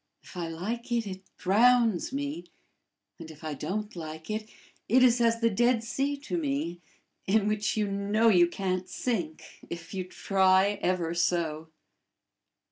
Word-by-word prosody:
If - - -14
I 175 -2 -3
like 210 +10 -5
it, 235 -2 +1
it 190 -1 -6 0.2
drowns 230 +1 +3
me; 285 +4 -4 0.7
and, 165 -1 -9
if 155 0 -13
I 155 -1 -3
don't 210 +9 -4
like 160 +2 -7
it, 215 0 -4 0.4
it 255 +4 +5
is 240 -1 +5
as 230 0 +2
the 230 - +4
Dead 240 +2 +2
Sea 275 +5 -1
to 180 -11 -2
me, 155 +4 -2 0.5
in 205 +1 +3
which 210 0 0
you 210 - +2
know 200 +3 +1
you 175 -4 +6
can't 185 0 -3
sink, 180 -7 -3 0.3
if 170 +2 -7
you 190 -1 -2
try 190 +1 +2
ever 175 -2 0
so." 165 -2 0
195 Hz, 155 wpm, -28 LUFS, 170-230 Hz, 0.7 s, you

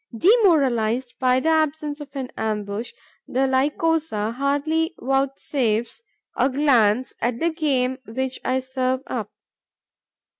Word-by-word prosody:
Demoralized 260 - +3
by 255 0 +3
the 320 - 0
absence 310 -1 0
of 295 -1 -8
an 265 -2 -4
ambush, 210 +1 -3 0.4
the 260 - -1
Lycosa 275 -3 0
hardly 290 +5 0
vouchsafes 270 - -1 0.3
a 265 - +2
glance 255 -4 +2
at 240 0 -1
the 335 +1 +1
game 265 -5 0
which 260 +3 -3
I 260 +1 0
serve 260 0 -1
up. - - -4
260 Hz, 115 wpm, -23 LUFS, 245-300 Hz, 0.4 s, Demoralized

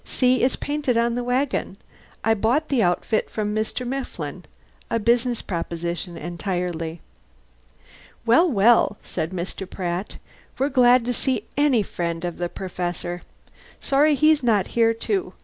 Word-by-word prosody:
See, 255 -1 +2
it's 255 +1 +2
painted 290 -5 -1
on 235 0 +2
the 245 +1 -2
wagon. 250 -5 -1 0.5
I 225 - +4
bought 235 +9 +1
the 265 -5 +2
outfit 180 +3 +1
from 210 -1 -2
Mr. 215 +3 -2
Mifflin. 270 +2 -5 0.4
A - - +1
business 235 +2 +1
proposition 170 0 -3
entirely." 175 -1 -3 1.2
"Well, 255 +10 +5
well," 220 -2 +4
said 160 - -3
Mr. 185 +1 -5
Pratt. 180 +1 -4 0.4
"We're 275 +2 +1
glad 250 -2 +5
to 245 - 0
see 245 -3 -1
any 280 -6 +3
friend 170 -2 -3
of 175 -1 -4
the 175 0 -1
Perfessor. 175 -1 -4 0.6
Sorry 290 +2 +3
he's 305 +1 +4
not 215 -6 +2
here, 230 -1 +3
too. 380 - -2
225 Hz, 140 wpm, -23 LUFS, 180-255 Hz, 1.2 s, Well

